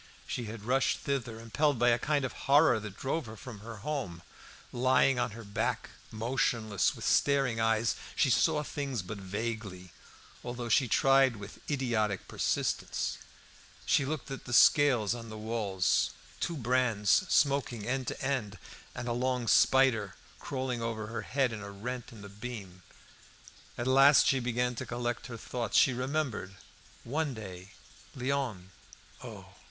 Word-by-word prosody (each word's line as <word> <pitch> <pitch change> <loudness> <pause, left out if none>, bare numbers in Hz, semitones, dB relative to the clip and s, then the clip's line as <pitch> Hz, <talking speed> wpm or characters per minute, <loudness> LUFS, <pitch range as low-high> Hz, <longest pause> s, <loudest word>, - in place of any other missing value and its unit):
She 120 - -4
had 110 -1 -8
rushed 130 +4 +1
thither; 125 -5 -3
impelled 145 +5 +1
by 120 +1 +4
a 120 0 +3
kind 145 -2 0
of 125 - -4 0.2
horror 140 -5 +6
that 105 -2 -8
drove 135 0 -2
her 110 0 -9
from 115 -1 -9
her 115 +2 -8
home. 125 - -3 0.5
Lying 130 +1 +3
on 120 0 +1
her 115 - -8
back, 100 -1 -2 0.2
motionless, 110 -2 0
and - - -7
with - - -7
staring 135 -5 +2
eyes, 115 0 +2 0.2
she 135 - +3
saw 150 +3 +3
things 135 -7 -3
but 100 +3 -7
vaguely, 100 -2 -5 0.5
although 120 -1 -5
she 130 +3 +4
tried 135 +2 +4
to - - -10
with 100 0 -10
idiotic 115 - 0
persistence. - - -1 0.7
She - - +3
looked 145 0 -4
at 135 - -6
the 120 - -5
scales 125 -5 +5
on 115 -1 -7
the 110 - -7
walls, 105 -4 0 0.3
two 170 -2 -2
brands 120 -5 +1 0.2
smoking 135 -6 +2
end 130 +1 -2
to - - -4
end, 125 -7 -2 0.4
and 120 - -5
a 120 - 0
long 125 0 -1
spider 115 -9 +4 0.2
crawling 130 -3 -3
over 115 -2 -3
her 115 +1 -5
head 130 +1 0
in 110 - -6
a 100 - -7
rent 120 +5 -5
in 110 -3 -12
the - - -8
beam. 100 -3 -8 1.0
At 120 - -3
last 135 +2 +6
she 135 - +3
began 125 0 0
to - - -4
collect 120 0 -3
her 120 -3 -7
thoughts. 120 0 -2
She 130 - +5
remembered 125 -7 -2 0.5
one 145 +2 -2
day 95 -3 -9 0.4
Léon 125 -8 -2 0.5
Oh! - - -9
120 Hz, 160 wpm, -30 LUFS, 110-135 Hz, 1.0 s, horror